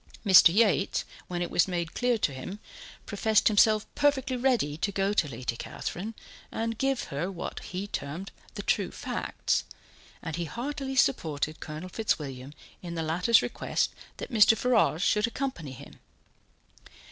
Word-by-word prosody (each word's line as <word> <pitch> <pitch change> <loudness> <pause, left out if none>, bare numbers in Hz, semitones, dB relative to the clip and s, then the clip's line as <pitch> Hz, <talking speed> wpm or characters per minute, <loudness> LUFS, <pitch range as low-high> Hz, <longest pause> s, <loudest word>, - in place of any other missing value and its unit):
Mr. 185 -4 +8
Yates, 200 -1 +2 0.2
when 175 -1 -2
it 175 - -5
was 175 - +3
made 170 -3 -3
clear 245 -1 +1
to 150 -9 0
him, 135 +10 -6 0.5
professed 215 +1 +2
himself 215 0 +4
perfectly 275 -3 +1
ready 245 - +1
to 200 +6 -1
go 195 +1 0
to 170 -7 +2
Lady 125 -2 -4
Catherine 205 - -5 0.4
and 230 0 -2
give 270 -1 +1
her 170 +7 -2
what 180 - -5
he 185 +2 -5
termed 175 0 -5 0.2
the - - -5
true - - +1
facts, - - -2 0.6
and 165 -1 -4
he 170 - -2
heartily 270 - -4
supported 155 - +1
Colonel 155 +4 -7
Fitzwilliam 145 - -3 0.3
in 170 -1 -6
the 165 - -2
latter's 180 +9 +3
request - - -1 0.3
that - - -7
Mr. 220 0 +6
Ferrars 220 -9 +2
should 210 +1 +3
accompany 230 - -4
him. 140 +2 -13
195 Hz, 150 wpm, -28 LUFS, 160-230 Hz, 0.6 s, Mr